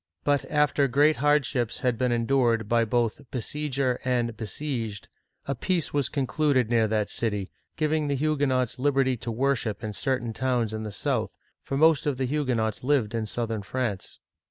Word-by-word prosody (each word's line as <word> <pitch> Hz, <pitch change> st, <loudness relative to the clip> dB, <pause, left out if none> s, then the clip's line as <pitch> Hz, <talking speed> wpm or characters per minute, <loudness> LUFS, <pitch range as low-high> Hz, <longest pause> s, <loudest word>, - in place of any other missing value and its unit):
But 145 Hz, -1 st, +1 dB
after 150 Hz, -1 st, +2 dB
great 145 Hz, +4 st, +4 dB
hardships 145 Hz, -5 st, +1 dB
had 125 Hz, -2 st, +1 dB
been 125 Hz, +1 st, 0 dB
endured 120 Hz, -2 st, +2 dB
by 115 Hz, +1 st, +3 dB
both 115 Hz, +2 st, 0 dB
besieger 135 Hz, 0 st, -1 dB
and 120 Hz, -3 st, 0 dB
besieged, 115 Hz, -2 st, -4 dB, 0.4 s
a 140 Hz, -, 0 dB
peace 170 Hz, +5 st, -1 dB
was 145 Hz, -3 st, +1 dB
concluded 135 Hz, -3 st, +1 dB
near 115 Hz, -2 st, +3 dB
that 105 Hz, -1 st, -1 dB
city, 105 Hz, -4 st, -2 dB, 0.3 s
giving 155 Hz, 0 st, +1 dB
the 140 Hz, -, 0 dB
Huguenots 135 Hz, -4 st, 0 dB
liberty 135 Hz, -1 st, +2 dB
to 120 Hz, -, -6 dB
worship 120 Hz, -3 st, -1 dB
in 105 Hz, -1 st, -3 dB
cer 130 Hz, +4 st, 0 dB
tain 120 Hz, -2 st, -5 dB
towns 120 Hz, -3 st, 0 dB
in 110 Hz, -, -3 dB
the 110 Hz, -1 st, -5 dB
south; -, -, -2 dB, 0.2 s
for 135 Hz, -, -3 dB
most 160 Hz, 0 st, +4 dB
of 140 Hz, -3 st, 0 dB
the 130 Hz, -, 0 dB
Huguenots 125 Hz, -7 st, -1 dB
lived 125 Hz, -6 st, +1 dB
in 115 Hz, -1 st, -2 dB
southern 115 Hz, -1 st, -2 dB
France. 110 Hz, -2 st, -4 dB
125 Hz, 170 wpm, -26 LUFS, 115-145 Hz, 0.4 s, great